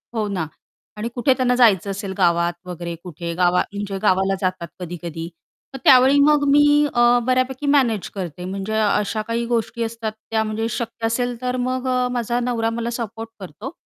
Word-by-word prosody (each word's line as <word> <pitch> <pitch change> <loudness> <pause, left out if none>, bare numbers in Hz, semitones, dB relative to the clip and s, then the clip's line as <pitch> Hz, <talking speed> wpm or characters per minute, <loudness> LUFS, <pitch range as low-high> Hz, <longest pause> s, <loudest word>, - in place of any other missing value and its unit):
हो 215 -2 0
ना 185 -5 -2 0.5
आणि 225 +3 -3
कुठे 255 +2 +3
त्यांना 250 -1 +1
जायचं 205 -6 +4
असेल 195 0 -5
गावात 170 -1 +2
वगैरे 175 -1 -5
कुठे 170 -1 -6
गावा 180 0 +3
म्हणजे 200 -1 -4
गावाला 190 -1 +2
जातात 185 -2 -2
कधी-कधी 170 -1 -6 0.4
तर - - -5
त्यावेळी 265 +2 +6
मग 295 0 +4
मी 290 +1 +6 0.3
अ, 240 - +2 0.3
बऱ्यापैकी 255 +2 0
मॅनेज 250 -8 +2
करते 180 -2 -5
म्हणजे 195 +3 -4
अशा 210 +1 +1
काही 235 +1 -1
गोष्टी 235 0 -1
असतात 225 -1 -4 0.2
त्या 220 -1 +2
म्हणजे 220 +1 -2
शक्य 230 -1 -4
असेल 245 +1 -1
तर 250 0 -1
मग 255 0 -2
अ, 250 -1 +1
माझा 240 0 -1
नवरा 235 -2 0
मला 235 +1 -3
सपोर्ट 225 0 -6
करतो. 200 - -8
225 Hz, 175 wpm, -21 LUFS, 185-245 Hz, 0.5 s, त्यावेळी